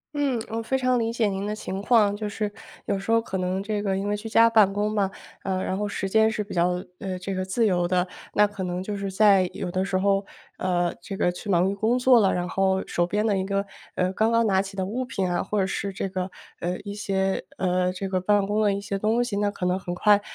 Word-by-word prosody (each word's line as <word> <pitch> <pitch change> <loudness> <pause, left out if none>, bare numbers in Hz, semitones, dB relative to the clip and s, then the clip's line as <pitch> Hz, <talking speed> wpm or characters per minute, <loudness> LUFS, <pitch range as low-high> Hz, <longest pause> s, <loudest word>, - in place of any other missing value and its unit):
嗯， 280 -4 +1
我 225 +1 -2
非 265 +4 0
常 255 -1 +2
理 230 0 -1
解 225 -3 +1
您 195 +1 -2
的 210 - -2
情 195 -2 -5
况。 210 -2 +4
就 210 -1 -3
是 205 0 -3 0.3
有 195 - -1
时 195 - -9
候 230 0 +4
可 195 -4 -4
能 185 +1 -1
这 210 0 -2
个 195 -2 0
因 200 +1 -2
为 210 - 0
居 220 +2 -7
家 230 +1 +5
办 210 -4 +5
公 210 +1 0
嘛， 200 -3 +1 0.3
呃， 190 -1 -1
然 190 - -2
后 210 0 -1
时 195 -1 -3
间 220 +1 +4
是 215 -1 -2
比 205 - -9
较， 180 +1 +1 0.2
呃， 185 -2 -4
这 190 +2 -4
个 185 0 -2
自 220 +5 +1
由 175 -3 +2
的。 180 0 +2 0.3
那 210 - +5
可 205 -2 -5
能 180 0 -3
就 205 +1 -4
是 200 0 -3
在 195 -2 +4
有 175 - -4
的 185 +1 0
时 190 -1 0
候， 195 +1 +2 0.3
呃， 175 -1 0
这 195 - -6
个 175 - +1
去 190 +3 -8
忙 185 +1 +3
于 - - -2
工 225 +5 +1
作 250 -1 +6
了， 195 -3 +3
然 180 0 -2
后 190 0 +1
手 175 0 0
边 210 +3 0
的 205 -3 +2
一 190 - -1
个， 200 0 -1 0.3
呃， 180 0 +1
刚 220 +4 +1
刚 230 0 +4
拿 190 -2 +3
起 195 0 -8
的 190 -1 -1
物 245 +6 -3
品 190 -7 -2
啊， 175 - +1
或 205 +1 -1
者 190 - +2
是 195 0 -3
这 190 - -3
个 185 0 -3 0.3
呃， 180 +1 -2
一 200 -1 -6
些 195 -2 -1
呃， 180 0 +1
这 195 0 -4
个 185 -1 0
办 205 +1 +2
公 210 +2 0
的 205 -2 +3
一 200 - -3
些 200 -1 -3
东 225 +4 +2
西， 215 -5 -3
那 205 0 +1
可 200 -3 -4
能 180 +1 +1
很 175 -1 -5
快， 205 +2 +4
195 Hz, 290 characters per minute, -25 LUFS, 185-210 Hz, 0.3 s, 作